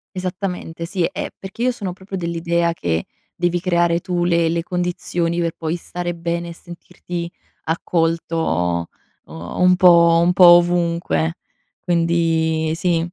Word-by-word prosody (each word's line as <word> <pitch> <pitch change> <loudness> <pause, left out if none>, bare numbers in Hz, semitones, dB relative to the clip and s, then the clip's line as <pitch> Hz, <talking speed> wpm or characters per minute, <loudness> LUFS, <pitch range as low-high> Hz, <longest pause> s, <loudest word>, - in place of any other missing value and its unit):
Esattamente 180 -2 -4
sì, 175 0 -2
eh, - - -5
perché 195 +5 -7
io 255 - +3
sono 200 -7 -5
proprio 190 0 -7
dell'idea 170 0 0
che, 85 - -2 0.3
devi 175 0 0
creare 170 -2 +2
tu 175 -1 -1
le 170 -1 +2
le 165 0 -1
condizioni 175 -1 -2
per 165 -1 -1
poi 160 0 -3
stare 175 0 -5
bene 170 0 -3
e - - -7
sentirti 175 0 -8 0.4
accolto, 160 - -1 0.4
un 85 - 0
po' 170 -2 +6
un 175 +1 +3
po' 180 - +6
ovunque, 170 - +4 0.4
quindi 165 -2 +1
sì. 175 -2 +1
170 Hz, 135 wpm, -20 LUFS, 165-175 Hz, 0.4 s, po